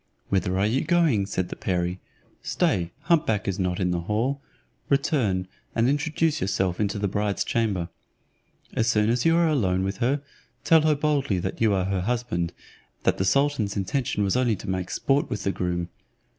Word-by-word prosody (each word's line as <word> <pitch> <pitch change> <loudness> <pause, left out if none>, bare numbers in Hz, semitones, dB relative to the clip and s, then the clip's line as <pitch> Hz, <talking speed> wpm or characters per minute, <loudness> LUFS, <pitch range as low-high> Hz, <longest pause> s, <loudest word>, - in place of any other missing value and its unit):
"Whither 95 -1 +1
are 95 - +2
you 115 +6 +1
going?" 155 - +2
said 95 -2 -2
the - - -5
perie; 90 -1 -1 0.4
"stay, 85 -3 0
hump 165 -2 +2
back 105 -3 0
is 95 0 -1
not 90 -1 -1
in 90 -2 +1
the 90 - 0
hall, 115 +10 -1 0.5
return, 120 - +1 0.3
and 115 +1 +3
introduce 155 +2 +1
yourself 95 -2 0
into 105 -1 0
the 100 0 0
bride's 100 +1 -1
chamber. 100 -7 0 0.9
As 115 - +1
soon 110 -2 +3
as 120 0 0
you 165 0 +5
are 170 -1 +4
alone 95 -12 +1
with 95 0 -2
her, 135 +4 0 0.4
tell 160 -1 +5
her 155 -1 +3
boldly 140 -7 +1
that 95 +4 -4
you 110 -2 +4
are 95 -1 0
her 95 -1 -1
husband, 100 -6 -1 0.5
that - - +1
the 95 - +1
sultan's 130 -3 +1
intention 105 +2 -1
was 100 +2 +1
only 125 -3 +2
to - - -10
make 95 -1 -2
sport 140 +1 +1
with 105 - -3
the 100 - +1
groom. 90 -2 -2
105 Hz, 185 wpm, -25 LUFS, 95-135 Hz, 0.9 s, you